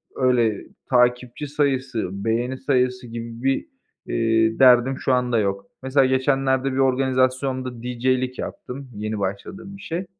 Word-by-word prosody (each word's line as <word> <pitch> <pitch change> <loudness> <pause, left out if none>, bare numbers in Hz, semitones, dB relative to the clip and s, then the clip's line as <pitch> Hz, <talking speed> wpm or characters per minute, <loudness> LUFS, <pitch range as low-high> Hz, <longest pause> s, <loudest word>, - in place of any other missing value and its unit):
öyle 120 -5 +1 0.2
takipçi 125 +2 +1
sayısı, 135 -7 -1 0.2
beğeni 120 +3 0
sayısı 125 -2 0
gibi 115 +1 -7
bir, 135 0 +1 0.4
eee, 115 -1 +1
derdim 130 0 +6
şu 130 - +1
anda 125 -2 +1
yok. 100 -1 -1 0.2
Mesela 135 +1 +3
geçenlerde 130 0 +1
bir - - -3
organizasyonda 130 -1 0
DJ'lik 125 +1 -1
yaptım, 135 +1 -7
yeni 105 +1 -3
başladığım 100 - -5
bir - - -14
şey. 175 +2 -4
130 Hz, 130 wpm, -23 LUFS, 115-135 Hz, 0.4 s, derdim